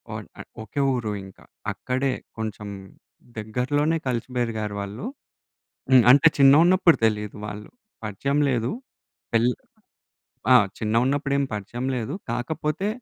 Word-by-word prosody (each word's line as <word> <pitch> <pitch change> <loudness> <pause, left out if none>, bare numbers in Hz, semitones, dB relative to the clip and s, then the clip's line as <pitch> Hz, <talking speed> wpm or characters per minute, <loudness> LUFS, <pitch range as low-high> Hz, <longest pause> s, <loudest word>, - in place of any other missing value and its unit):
One - - -7
ఆహ్, - - -9 0.2
ఒకే 140 +5 -3
ఊరు 120 -4 -2
ఇంకా. 95 - -15 0.3
అక్కడే 130 +1 -1 0.3
కొంచెం 110 -1 -5 0.7
దగ్గరలోనే 140 +9 0
కలిసి 120 -1 -2
బెరిగారు 110 -4 -2
వాళ్ళు. 100 +5 -6 0.9
హ్మ్. 130 -2 +8
అంటే 140 +4 +5
చిన్నగున్నప్పుడు 165 +6 +6
తెలీదు 105 -1 -2
వాళ్ళు. 105 0 -8 0.3
పరిచయం 135 +8 -1
లేదు. 120 -2 0 0.6
పెల్ 115 +1 +4 1.0
ఆ! - - +8 0.2
చిన్నగున్నప్పుడేం 135 +6 +1
పరిచయం 115 +5 -5
లేదు. 115 -3 -3 0.2
కాకపోతే 150 +9 -2
125 Hz, 110 wpm, -24 LUFS, 110-140 Hz, 1.0 s, హ్మ్